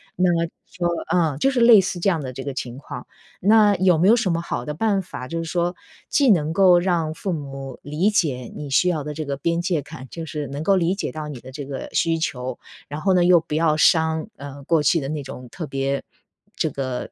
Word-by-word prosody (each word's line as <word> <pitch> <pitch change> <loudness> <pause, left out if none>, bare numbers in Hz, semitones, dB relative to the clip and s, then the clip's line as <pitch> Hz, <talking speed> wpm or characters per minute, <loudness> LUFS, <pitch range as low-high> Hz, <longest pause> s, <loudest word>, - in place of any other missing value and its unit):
那 180 0 +3 0.4
就 175 -1 -2 0.2
呃， 160 -6 +2
就 270 - +3
是 255 - 0
类 235 -3 +8
似 180 -1 -3
这 195 - 0
样 165 -5 0
的 130 -2 -6
这 135 - -6
个 140 - -4
情 120 0 -5
况， - - -8 0.4
那 210 +1 +5
有 180 -2 +4
没 175 +5 +3
有 230 - +7
什 200 -7 0
么 165 - 0
好 170 - -4
的 150 - -3
办 200 +3 +1
法 130 -8 -8
就 165 - -4
是 - - -6
说 175 +1 -1 0.3
既 275 -4 +3
能 160 -4 +2
够 185 -1 +6
让 170 -4 0
父 190 - -3
母 135 -3 -7
理 155 +8 +1
解 135 - 0
你 145 - -6
需 180 +7 +3
要 155 -5 -1
的 150 - -5
这 155 - -4
个 140 -1 -3
边 170 +4 0
界 170 -4 0
感， 145 -2 -10
就 165 - -7
是 150 -2 -4
能 140 +3 -5
够 195 +3 +4
理 180 0 +2
解 - - -3
到 155 -1 -6
你 140 -5 -7
的 130 - -12
这 145 0 -6
个 135 -1 -6
需 165 -1 +2
求， 130 -5 -3 0.3
然 145 +2 -6
后 195 - +3
呢 175 - +4
又 175 -1 +6
不 150 -1 -5
要 160 -1 +3
伤 160 +2 +3
呃， 140 0 -9
过 160 +2 +2
去 165 +4 +3
的 135 - -4
那 150 -2 -3
种 125 -1 -9
特 170 - -6
别 135 0 -2 0.5
这 160 - 0
个 130 -2 -4
160 Hz, 260 characters per minute, -22 LUFS, 140-180 Hz, 0.5 s, 类